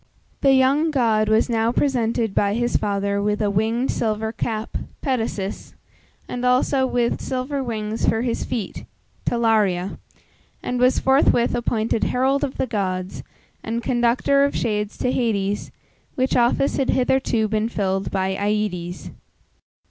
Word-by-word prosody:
The 270 -1 +5
young 275 +5 +3
god 225 -7 +2
was 220 +1 +3
now 230 -1 +1
presented 235 -5 0
by 200 +1 +1
his 240 +1 -1
father 200 0 0
with 210 0 0
a 210 -2 +1
winged 225 +5 0
silver 220 -1 -1
cap 220 -1 -4 0.3
(Petasus), 225 -7 -3 0.5
and 245 - -5
also 260 +1 +2
with 245 -2 0
silver 265 +2 -3
wings 220 -2 -1
for 225 +1 0
his 240 -2 -1
feet 225 -6 -4 0.4
(Talaria), 210 -6 +1 0.6
and 250 - -2
was 250 +1 +4
forthwith 265 -3 +3
appointed 230 -2 0
herald 265 +2 +1
of 270 - -3
the - - 0
gods, 185 -5 -3 0.4
and 230 +1 -3
conductor 245 +3 +2
of 280 - 0
shades 210 -2 -2
to 250 - 0
Hades, 205 -5 -1 0.5
which 260 0 0
office 245 +3 +2
had 270 - 0
hitherto 250 -3 +1
been 215 +1 0
filled 195 -3 -1
by 190 0 -1
Aïdes. 200 -4 -2
230 Hz, 140 wpm, -22 LUFS, 210-255 Hz, 0.6 s, The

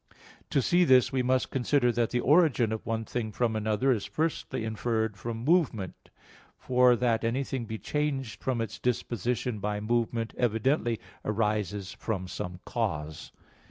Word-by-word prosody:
To 135 - +2
see 175 +6 +4
this, 130 -6 +5
we 130 -1 +1
must 130 +1 +1
consider 130 -1 +2
that 115 -1 0
the 125 - 0
origin 140 -6 +4
of 110 - -3
one 115 -1 -1
thing 110 -2 -3
from 115 +1 0
another 110 +5 +1
is 110 -6 0
firstly 155 -7 -2
inferred 110 -1 -1
from 115 +4 -5
movement: 145 - +1 0.5
for 125 -1 +4
that 120 -1 +1
anything 130 +1 -1
be 110 0 -5
changed 135 -5 -2
from 125 -3 -1
its 110 -1 -5
disposition 120 -1 -1
by 105 +1 -2
movement 115 +1 -1
evidently 120 0 +1 0.2
arises 105 -3 -1
from 95 -5 -3
some 90 0 -6
cause. 80 -10 -3
115 Hz, 150 wpm, -28 LUFS, 110-125 Hz, 0.5 s, this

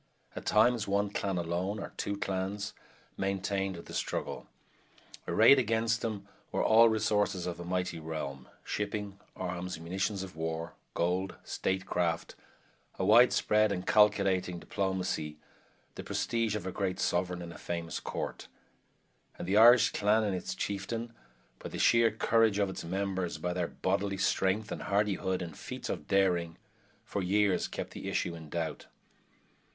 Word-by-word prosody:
At - - -7
times 110 +1 +4
one 100 +1 +1
clan 100 -2 -1
alone, 90 +4 -1
or - - -7
two 100 0 -2
clans, 100 +1 -3 0.4
maintained 95 0 -1
the 85 - -10
struggle. - - -3 0.8
Arrayed 140 - +7
against 115 -1 +1
them 110 -3 -4 0.2
were - - 0
all 115 +1 +7
the - - +6
resources 105 -4 +1
of 90 -1 -4
a - - -5
mighty 90 -1 -2
realm 75 -4 -5 0.2
shipping, 105 -1 -3 0.2
arms, 90 -1 -4
munitions 95 +4 -2
of 95 -3 -9
war, 80 +1 -3 0.2
gold, 90 +3 0
statecraft, 90 -3 -1 0.6
a 95 - 0
widespread 110 -1 +5
and 90 -2 -3
calculating 100 -4 +3
diplomacy, 90 -5 -2 0.6
the - - -7
prestige 115 -2 -1
of 105 - -4
a 95 - -2
great 95 -1 -2
Sovereign 90 0 0
and 85 0 -8
a - - -12
famous 85 -1 -4
Court - - -5 0.9
and - - -6
the 95 - +1
Irish 120 +2 +8
clan 105 +2 +2
and 100 -3 0
its 90 - -4
chieftain, 115 +4 -3 0.5
by - - -7
the - - -6
sheer 115 -1 +5
courage 110 -1 +2
of 100 -2 +1
its - - -6
members, 95 -2 -2
by 90 +3 -2
their 90 -1 -1
bodily 100 +1 -1
strength 95 +3 +1
and - - -4
hardihood 100 -2 0
and 85 -3 -7
feats - - -7
of - - -4
daring, 90 -4 +2 0.5
for 100 - -3
years 100 +1 +2
kept - - -5
the - - -6
issue 85 - -1
in 80 -2 -10
doubt. 80 -1 -3
95 Hz, 150 wpm, -31 LUFS, 90-105 Hz, 0.9 s, Irish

